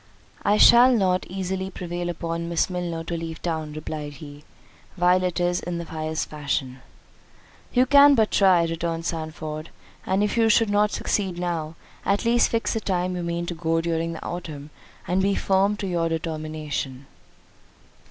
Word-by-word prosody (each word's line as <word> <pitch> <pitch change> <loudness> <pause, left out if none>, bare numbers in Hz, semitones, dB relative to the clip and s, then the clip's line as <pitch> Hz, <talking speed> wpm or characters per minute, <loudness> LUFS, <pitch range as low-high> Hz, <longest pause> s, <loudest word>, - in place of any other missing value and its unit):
"I 210 - +2
shall 240 +4 +8
not 185 -5 +1
easily 190 0 -3
prevail 175 -2 -5
upon 170 0 -3
Miss 170 +2 0
Milner 175 -2 -3
to 170 +1 -4
leave 165 -1 -5
town," 160 -3 -3
replied 150 -1 -6
he, 145 +1 -11 0.5
"while 180 0 +3
it 180 -1 -1
is 175 0 +1
in 175 0 -4
the 170 - -4
highest 160 -1 -3
fashion." 140 -3 -3 0.9
"You 250 0 +4
can 285 +1 +7
but 220 -3 +2
try," 185 -4 +5
returned 165 0 -3
Sandford; 155 -1 -5 0.4
"and 190 +2 +2
if 210 - -1
you 225 -1 +4
should 220 -1 +3
not 210 +1 +3
succeed 190 -3 -2
now, 170 -3 -3 0.3
at 200 +3 0
least 235 +1 +4
fix 230 0 0
the 225 - -1
time 185 -3 -1
you 180 - -3
mean 170 0 -2
to 175 - -4
go 165 0 0
during 165 0 -1
the 160 - -8
autumn, 155 -4 -6 0.4
and 185 +2 +1
be 195 +1 +2
firm 195 +2 +2
to 205 - -4
your 170 -3 0
determination." 155 -4 -4
170 Hz, 170 wpm, -24 LUFS, 160-190 Hz, 0.9 s, shall